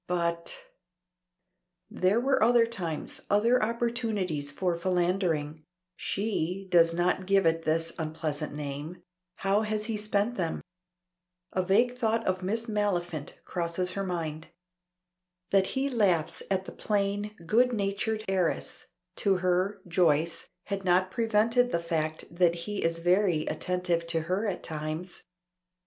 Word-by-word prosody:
But 170 - -2 1.3
There 190 +5 +2
were 270 +2 +2
other 235 +1 +5
times, 175 -9 -5
other 230 +5 +4
opportunities 220 - -1
for 175 +3 0
philandering 170 -4 0 0.3
(she 195 -2 -2
does 165 -1 +6
not 180 +2 0
give 195 -2 +4
it 165 0 +2
this 165 +1 +1
unpleasant 155 -1 -3
name); 145 +3 -6 0.3
how 195 +2 +1
has 215 -1 -1
he 225 -1 -2
spent 210 +3 0
them? 170 -4 -1 0.9
A 185 - +2
vague 235 +7 +2
thought 225 -1 +1
of 185 0 0
Miss 220 +5 -1
Maliphant 175 - -1
crosses 175 +1 -1
her 195 - -2
mind. 160 -4 -3 1.0
That 195 -1 +4
he 270 +1 +2
laughs 200 - +1
at 190 -1 0
the - - -7
plain, 205 0 -1
good 245 +8 +4
natured 215 0 -1
heiress 185 -3 -1 0.3
to 195 -2 +3
her 185 +2 0
(Joyce), 165 -2 +2
had 200 -1 -4
not 185 +1 +3
prevented 230 +3 +2
the - - +2
fact 160 -2 -2
that 170 -1 +4
he 205 -1 -3
is 165 0 +1
very 175 -2 +2
attentive 175 +1 -1
to 165 -1 +1
her 185 +7 -1
at 195 - -3
times. 155 +3 -5
185 Hz, 130 wpm, -29 LUFS, 165-210 Hz, 1.3 s, does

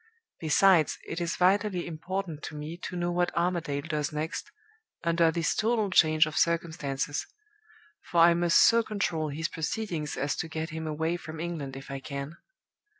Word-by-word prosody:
Besides, 165 0 +4
it 175 - -4
is 170 0 -1
vitally 190 0 +2
important 170 0 -4
to 150 - -7
me 150 +2 -6
to 180 - -5
know 175 0 -1
what 175 0 +1
Armadale 170 -5 0
does 150 -2 -1
next, 155 +4 -4 0.5
under 170 0 +3
this 165 0 0
total 220 -2 +1
change 155 -3 +5
of 155 0 -6
circumstances 155 -5 -1 0.8
for 170 - +3
I 170 +1 +8
must 170 0 +5
so 230 0 +5
control 175 -8 -2
his 160 +3 -2
proceedings 160 -2 -3
as 145 +2 -1
to - - -2
get 160 +1 -4
him 160 0 -5
away 160 +3 -1
from 160 -2 -9
England 160 -6 -4
if 135 0 -9
I 135 - -4
can. 140 +3 -6
165 Hz, 165 wpm, -28 LUFS, 155-175 Hz, 0.8 s, I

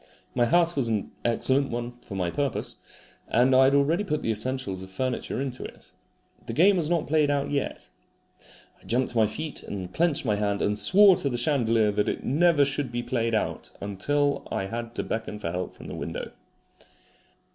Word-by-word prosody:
My 120 -1 +2
house 170 +3 +3
was 135 -4 +1
an 110 -3 -2
excellent 130 +4 +1
one 120 0 -4
for 100 - -9
my 90 -3 -1
purpose, 140 +1 -2 0.5
and 125 +3 +3
I 130 +1 +6
had 135 +1 +4
already 150 +7 +2
put 155 -6 -2
the 115 - 0
essentials 110 -3 -3
of 95 - -9
furniture 125 +5 -3
into 130 -2 -4
it. - - -12 0.6
The - - -4
game 190 +6 +5
was 160 -3 -1
not 170 -3 +1
played 150 -1 +2
out 145 -1 0
yet. 140 - -2 0.9
I - - -25
jumped 125 +3 +1
to 120 - -4
my 110 -1 +4
feet 155 +7 -5
and 95 -3 -7
clenched 165 -5 +1
my 105 -3 +1
hand, 100 -1 0
and 105 - +1
swore 185 - +7
to 140 - 0
the 120 - -2
chandelier 115 -5 +2
that 105 0 0
it - - -4
never 155 +1 +3
should 135 -2 -1
be 120 0 -3
played 115 -3 -1
out 110 - -2
until 140 +9 -1
I 95 - -1
had 115 +3 -6
to - - -2
beckon 110 -1 -4
for 85 -5 -4
help 90 +1 -4
from - - -13
the - - -7
window. - - -5
125 Hz, 200 wpm, -26 LUFS, 110-145 Hz, 0.9 s, swore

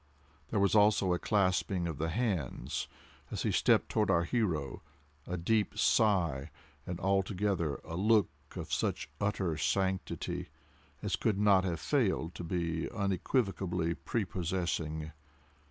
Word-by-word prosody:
There 105 - 0
was 100 -1 +3
also 105 -3 +4
a 90 - 0
clasping 95 -2 +1
of 80 -4 -4
the 80 +1 0
hands, 95 - -2 0.4
as - - -3
he - - +1
stepped - - +3
toward 105 -2 +1
our 85 -3 +4
hero—a 75 - -3
deep 105 +5 +1
sigh—and 85 - 0
altogether 95 -4 0
a 80 - -6
look 105 -1 +3 0.2
of - - -5
such - - -1
utter 95 -6 0
sanctity 95 +3 -1 0.6
as - - 0
could 105 -3 0
not 100 -2 +4
have 85 -3 -1
failed 95 - 0
to - - -7
be 85 -1 -2
unequivocally 95 -4 0
preposessing. 85 -7 -2
90 Hz, 120 wpm, -32 LUFS, 80-100 Hz, 0.6 s, also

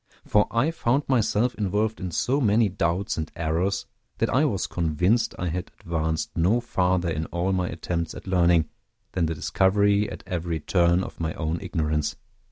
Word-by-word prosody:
For 105 0 +3
I 130 +8 +1
found 140 -3 +1
myself 120 -1 +2
involved 105 +2 -1
in 95 - -3
so 130 - 0
many 110 -2 +3
doubts 90 +1 -1
and 80 -1 -3
errors, 90 +5 -1 0.3
that 115 - 0
I 145 +4 +3
was 105 -10 0
convinced 90 +8 +1
I 90 - -2
had 90 +2 -4
advanced 80 +6 -2
no 95 +8 +3
farther 90 -6 0
in 80 0 -2
all 90 +2 -1
my 90 -1 0
attempts 85 -2 -3
at - - -9
learning, 85 -4 +3 0.4
than 85 -3 0
the 80 - -2
discovery 100 +5 +2
at - - -8
every 85 -3 -2
turn 85 +3 +2
of - - -9
my 80 -1 -2
own 80 +1 -2
ignorance. 75 -5 -1
90 Hz, 175 wpm, -25 LUFS, 85-105 Hz, 0.4 s, For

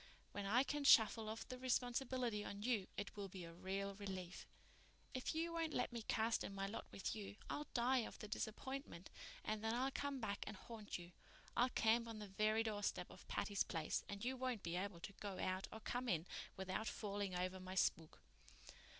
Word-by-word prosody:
When 200 -1 -2
I 240 +6 +6
can 295 +1 -1
shuffle 225 -4 +8
off 220 +1 -4
the 255 0 -5
responsibility 245 -3 +1
on 200 0 -5
you 225 -5 +2
it 205 - -3
will 200 -1 -3
be 185 -1 -6
a 165 - -8
real 195 +3 -2
relief. 190 -3 -5 0.7
If 255 +4 -1
you 335 +1 +1
won't 325 -2 0
let 250 0 +1
me 235 - -2
cast 225 +1 +2
in 195 - -4
my 195 0 0
lot 200 +3 -3
with 195 - -2
you 205 -2 -5 0.2
I'll 295 - -2
die 250 +2 +5
of 230 - -3
the 215 - -6
disappointment 220 - -3 0.3
and 215 0 0
then 225 +1 +2
I'll 260 +2 +2
come 285 0 -1
back 205 -4 -1
and - - -3
haunt 220 0 -5
you. 175 0 -9 0.4
I'll 245 +2 +5
camp 230 0 +4
on 225 -1 -5
the 210 - -4
very 215 +3 +3
doorstep 210 -2 -1
of - - -12
Patty's 200 -1 0
Place 160 -3 0
and 205 +2 -3
you 260 +1 +1
won't 255 -4 -1
be 170 0 -1
able 185 -2 -2
to 200 - -5
go 200 -2 -3
out 185 +1 0
or 220 - -6
come 245 +3 -1
in 170 -4 +2 0.3
without 190 +3 -1
falling 200 -3 -1
over 185 +1 0
my 185 0 -5
spook." 160 -3 +2
215 Hz, 200 wpm, -43 LUFS, 195-245 Hz, 0.7 s, shuffle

